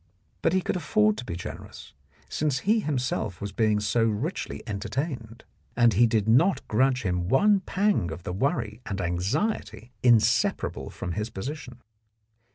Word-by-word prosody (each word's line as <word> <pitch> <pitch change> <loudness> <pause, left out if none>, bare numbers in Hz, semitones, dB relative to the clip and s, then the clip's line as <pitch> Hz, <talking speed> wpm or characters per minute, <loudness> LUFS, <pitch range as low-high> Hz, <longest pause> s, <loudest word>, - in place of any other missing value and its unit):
But 165 - +2
he 185 -1 +2
could - - -1
afford 215 +4 +2
to - - -5
be 85 - -4
generous, 90 - -9 0.3
since 145 -4 -1
he 220 +4 +3
himself 125 - -2
was 100 0 -5
being 110 -1 +2
so 105 +2 +1
richly 115 - -2
entertained, 115 +2 -4 0.3
and 120 -2 +5
he 120 - +5
did 110 -2 0
not 135 +13 +3
grudge 130 +3 +2
him 90 -2 -1
one 205 - +4
pang 195 - 0
of 85 +2 -7
the 90 - -4
worry 115 - -1
and 100 -1 -3
anxiety 105 - -2
inseparable 120 0 +2
from 90 - -5
his 105 +5 -3
position. 125 +3 -7
120 Hz, 155 wpm, -26 LUFS, 105-150 Hz, 0.3 s, and